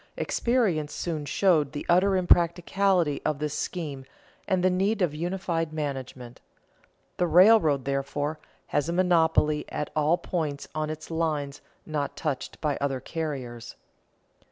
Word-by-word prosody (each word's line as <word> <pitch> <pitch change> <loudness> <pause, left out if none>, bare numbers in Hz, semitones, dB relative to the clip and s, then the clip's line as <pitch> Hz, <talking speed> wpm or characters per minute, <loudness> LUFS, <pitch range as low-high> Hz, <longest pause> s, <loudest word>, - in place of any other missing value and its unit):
Experience 200 -12 0
soon 160 -4 -3
showed 150 -1 +2
the 145 - -5
utter 190 +3 +4
impracticability 175 -2 +2
of 150 - 0
this 150 0 -3
scheme 150 -4 -4 0.4
and 185 -2 +1
the 185 - +5
need 195 +5 +1
of 175 -6 +1
unified 170 -1 -2
management. 130 -5 -5 0.8
The 180 - +1
railroad, 170 - +5
therefore, 140 +2 -2 0.3
has 145 +3 0
a - - -1
monopoly 160 -4 +3
at 150 - -4
all 155 +3 +3
points 155 -7 -3
on 155 -1 -2
its 155 +1 -7
line 155 -4 -1 0.3
not 150 -3 -3
touched 150 -5 -4
by 150 -3 0
other 135 -2 -1
carriers. 130 -6 -5
155 Hz, 130 wpm, -27 LUFS, 145-175 Hz, 0.8 s, the